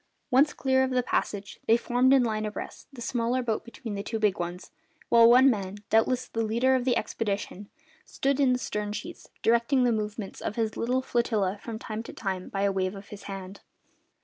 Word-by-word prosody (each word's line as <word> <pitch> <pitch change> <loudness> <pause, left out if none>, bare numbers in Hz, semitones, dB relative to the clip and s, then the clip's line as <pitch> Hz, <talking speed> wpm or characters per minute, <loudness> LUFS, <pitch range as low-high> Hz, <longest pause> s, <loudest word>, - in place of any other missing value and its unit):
Once 280 +4 +5
clear 265 -1 +2
of 260 - 0
the 255 -1 +1
passage, 200 -4 -2
they 225 - +6
formed 245 +2 +2
in 270 -2 +6
line 215 -2 -1
abreast, 215 -1 -6
the 260 -3 -11
smaller 245 +1 0
boat 225 -3 -1
between 235 -2 -8
the 200 - -3
two 225 +2 -3
big 210 -3 +1
ones, 175 +1 -5 0.4
while 230 0 +7
one 255 +3 +7
man, 200 -6 0 0.2
doubtless 245 +3 +2
the 225 - -3
leader 235 +4 +2
of 255 -1 +1
the 250 -2 +2
expedition, 205 -2 -3 0.3
stood 275 +1 -1
in 270 -3 +4
the 250 - +2
stern 210 -4 -3
sheets, 210 - -7
directing 235 +3 +3
the 245 - +3
movements 210 -2 -4
of - - -3
his 225 -2 -1
little 255 +3 0
flotilla 215 -6 0
from 230 -2 -6
time 220 0 -5
to 230 - -10
time 190 -3 -4
by 195 0 -2
a 200 - +3
wave 190 0 -1
of 200 0 -11
his 205 - -10
hand. 195 0 -7
225 Hz, 205 wpm, -27 LUFS, 205-250 Hz, 0.4 s, while